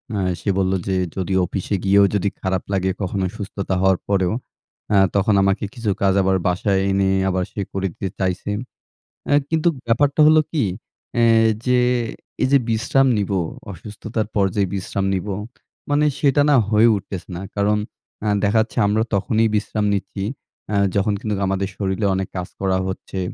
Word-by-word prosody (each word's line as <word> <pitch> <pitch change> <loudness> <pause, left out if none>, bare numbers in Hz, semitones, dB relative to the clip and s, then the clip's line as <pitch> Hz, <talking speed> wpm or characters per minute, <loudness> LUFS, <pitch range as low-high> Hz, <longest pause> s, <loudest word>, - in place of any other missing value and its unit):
আ 100 - 0 0.2
সে 100 - -3
বললো 95 0 +1
যে 95 - 0 0.2
যদি 95 0 -2
অফিসে 95 +3 -3
গিয়েও 100 +1 +5
যদি 100 0 +1
খারাপ 95 -1 -1
লাগে 95 0 +1
কখনো 95 0 -1
সুস্থতা 100 -1 -4
হওয়ার 95 -1 +4
পরেও 95 -1 +1 0.6
আ - - +5 0.2
তখন 100 +1 +3
আমাকে 100 +1 +1
কিছু 115 -4 -3
কাজ 100 -1 +3
আবার 95 0 +2
বাসায় 95 +2 +1
এনে 95 0 +2 0.2
আবার 95 0 0
সে 100 - -4
করে 95 0 -1
দিতে 95 - -4
চাইছে। 95 +1 -1 0.8
আ - - +5 0.2
কিন্তু 160 +1 +1 0.2
ব্যাপারটা 140 +6 +2
হলো 155 0 +6
কী? 155 -4 +1 0.6
এ - - +4 0.4
যে 125 -1 +3 0.6
এই - - +3
যে 140 - +7
বিশ্রাম 125 +4 +2
নিব 100 -1 -1 0.4
অসুস্থতার 105 +4 -5
পর্যায়ে 100 0 +1
বিশ্রাম 95 +1 -2
নিব 95 +1 -2 0.6
মানে 145 +1 +3
সেটা 145 0 +3
না 145 - +5
হয়ে 110 +2 +5
উঠতেছে 95 -1 -6
না। - - -6
কারণ 105 +1 +2 0.5
আ - - 0 0.2
দেখা 105 +2 +3
যাচ্ছে 110 - -5
আমরা 110 +2 +2
তখনই 110 +3 +2
বিশ্রাম 105 0 -1
নিচ্ছি 100 0 -3 0.5
আ - - +1 0.2
যখন 105 +1 +2
কিন্তু 105 -2 -2
আমাদের 95 0 -1
শরীরে 95 +1 -1
অনেক 95 -1 -2
কাজ 90 - -3
করা 95 -1 +1
হচ্ছে 95 0 -5
100 Hz, 165 wpm, -21 LUFS, 95-110 Hz, 0.8 s, যে